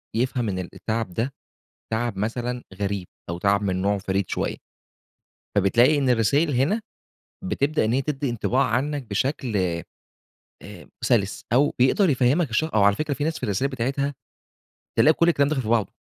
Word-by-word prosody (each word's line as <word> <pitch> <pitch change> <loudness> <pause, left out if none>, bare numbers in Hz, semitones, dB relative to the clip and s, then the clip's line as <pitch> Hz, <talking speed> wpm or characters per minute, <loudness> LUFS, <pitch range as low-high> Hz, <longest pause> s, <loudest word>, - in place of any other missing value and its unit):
يفهم 120 -2 0
إن 95 -1 -2
ال 90 - -5
التعب 110 -4 -3
ده 125 +7 -2 0.6
تعب 110 -3 -1
مثلًا 120 +3 -2
غريب 100 -2 -3 0.2
أو 85 - -3
تعب 100 +2 +2
من 95 -2 -1
نوعه 100 +1 +1
فريد 95 -1 -1
شوية. - - -2 1.0
فبتلاقي 120 +9 +4
إن 135 -2 +1
الرسايل 125 +7 +3
هنا 150 - +2 0.6
بتبدأ 155 - 0
إن 110 - +1
هي 135 - +2
تدّي 140 -1 -2
انطباع 120 +3 +1
عنك 140 +5 -1
بشكل 125 +1 -1 1.1
آآ 100 -3 -11
سلس 115 -5 +1
أو 145 +4 +4
بيقدر 155 +9 +4
يفهمك 135 +3 +2
الشخ 155 +8 0
أو 105 - +5
على 100 0 +5
فكرة 155 +2 -2
في 145 - -3
ناس 160 +1 -1
في - - -12
الرسايل 120 +7 0
بتاعتها 135 +3 -1 0.8
تلاقي 155 - +6
كل 170 - +3
الكلام 145 -4 +3
داخل 145 -4 -1
في 110 - -6
بعضه. 115 -5 +1
125 Hz, 170 wpm, -24 LUFS, 105-140 Hz, 1.1 s, تلاقي